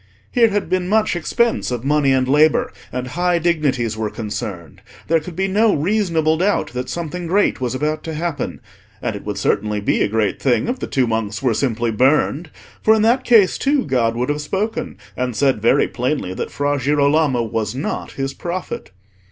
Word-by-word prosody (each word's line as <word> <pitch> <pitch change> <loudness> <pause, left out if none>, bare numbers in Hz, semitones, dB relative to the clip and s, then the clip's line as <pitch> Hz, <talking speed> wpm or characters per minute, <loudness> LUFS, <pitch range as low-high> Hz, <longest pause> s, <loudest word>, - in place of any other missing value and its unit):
Here 235 -3 +4
had 205 -3 -1
been 180 +1 -1
much 215 -2 +2
expense 235 +7 0
of 125 -2 -3
money 145 0 +2
and 130 -1 +2
labour, 150 +3 +3 0.2
and 125 0 -4
high 175 +3 +1
dignities 145 -9 0
were 110 -1 -2
concerned. 105 - -6 0.3
There 165 +1 +3
could 160 +2 -9
be 190 +2 0
no 210 +3 +3
reasonable 165 -2 +1
doubt 195 +4 0
that 125 0 -4
something 170 +1 -4
great 195 -5 +1
was 125 0 -1
about 155 +3 -2
to 160 -1 -4
happen; 160 -4 -3 0.4
and 110 - -3
it 100 - -8
would 105 -1 -4
certainly 105 +1 0
be 100 - 0
a - - +3
great 105 -1 -1
thing 130 - +2
if 250 +2 -2
the - - -4
two 130 -2 +1
monks 110 -1 -2
were 125 -3 +2
simply 115 -1 0
burned, 145 +7 +2 0.3
for 220 - +5
in 215 - +2
that 245 +4 +3
case 220 -7 +4
too 280 0 +1
God 120 -5 +1
would 125 +3 -1
have 145 0 -1
spoken, 195 +9 -3 0.2
and 125 -2 -2
said 135 -3 +2
very 115 - +3
plainly 125 -7 -2
that - - -4
Fra 145 0 -1
Girolamo 140 -1 +2
was 110 +1 -3
not 135 - -4
His 135 0 -3
prophet. 175 +4 -5
145 Hz, 195 wpm, -19 LUFS, 120-175 Hz, 0.4 s, for